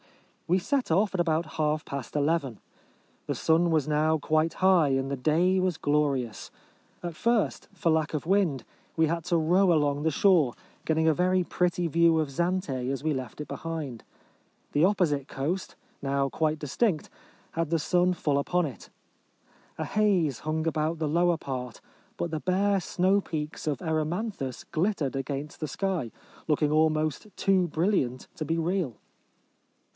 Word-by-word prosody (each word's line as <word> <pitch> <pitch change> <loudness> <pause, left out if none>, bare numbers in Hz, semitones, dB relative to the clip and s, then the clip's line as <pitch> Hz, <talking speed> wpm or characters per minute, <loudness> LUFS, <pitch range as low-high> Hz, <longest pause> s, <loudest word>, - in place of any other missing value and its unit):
Wo 180 - +3
set 260 - -1
off 195 +5 +2
at 190 - -2
about 165 -1 +1
half 155 0 0
past 140 -3 -6
eleven. 145 -6 0 0.7
The - - -1
sun 165 +2 +2
was 155 -4 +1
now 155 +1 +2
quite 155 +2 +1
high, 185 -5 +4
and 135 0 0
the 140 - -1
day 170 +8 +2
was 185 -3 0
glorious. 140 -6 0 0.5
At 170 -2 -4
first, 235 +4 0
for 170 - -1
lack 160 -1 +1
of 150 - -3
wind, 175 - +1 0.3
we 160 - +4
had 170 +1 -2
to 170 - +2
row 175 +4 +3
along 145 -3 +2
the 160 - +2
shore, 160 -6 +4 0.3
getting 160 0 +2
a 160 - +5
very 180 +3 +2
pretty 175 0 0
view 165 0 +4
of 155 -3 0
Zante 165 -5 -1
as 135 - -3
we 155 -1 +1
left 130 -1 -6
it 150 - -5
behind. 155 -8 -5 0.7
The 145 - +3
opposite 170 -8 +2
coast, 155 +5 -3 0.3
now 140 0 0
quite 155 +2 0
distinct, 155 - 0 0.4
had 165 -2 -2
the 165 0 +1
sun 180 +3 +2
full 145 -4 0
upon 180 +4 +1
it. 135 - -8 0.9
A - - -2
haze 190 - +1
hung 155 +1 -2
about 160 +1 0
the 155 -1 -1
lower 170 +2 +2
part, 125 -5 -5 0.4
but 170 - -2
the 155 -1 -3
bare 195 +1 +2
snow 190 +3 +2
peaks 155 -3 -5
of 150 +2 -1
Erymanthus 160 - -2
glittered 165 -5 0
against 140 +2 -4
the 155 - -3
sky, 180 - -2 0.4
looking 150 -1 +2
almost 155 +2 +1
too 190 -2 +3
brilliant 155 -7 0
to 170 - -4
be 165 +2 -1
real. 165 - -1
160 Hz, 160 wpm, -27 LUFS, 145-180 Hz, 0.9 s, a